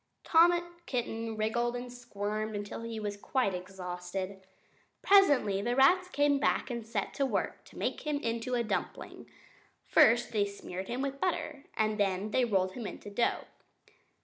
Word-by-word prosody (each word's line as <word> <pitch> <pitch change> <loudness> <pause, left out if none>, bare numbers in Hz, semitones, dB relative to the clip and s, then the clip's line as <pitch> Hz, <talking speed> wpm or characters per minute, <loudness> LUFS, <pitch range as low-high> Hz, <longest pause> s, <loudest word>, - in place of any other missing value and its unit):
Tom 335 +1 +6 0.4
Kitten 225 -3 -3
wriggled 235 +3 0
and 245 0 -6
squirmed 215 -2 -4
until 205 +2 -5
he 230 -1 -5
was 205 -1 -3
quite 205 0 0
exhausted. 185 +1 -5 0.6
Presently 285 - +5
the 240 +3 0
rats 355 +8 +5
came 290 -5 +2
back 275 - +1
and 235 -1 -4
set 215 -3 -3
to 280 - 0
work 270 - -1
to - - -15
make - - -2
him 300 -1 -1
into 235 -1 -2
a 240 - +1
dumpling. 220 - -4 0.6
First 235 +2 +5
they 210 -3 +2
smeared 190 -2 -7
him 250 +3 -2
with 275 0 -4
butter, 305 -5 -2
and 215 0 +1
then 195 +1 0
they 255 +2 +3
rolled 190 -4 +1
him 220 +2 -6
in - - -7
the 205 - -10
dough. 235 +4 0
230 Hz, 165 wpm, -31 LUFS, 200-255 Hz, 0.6 s, Tom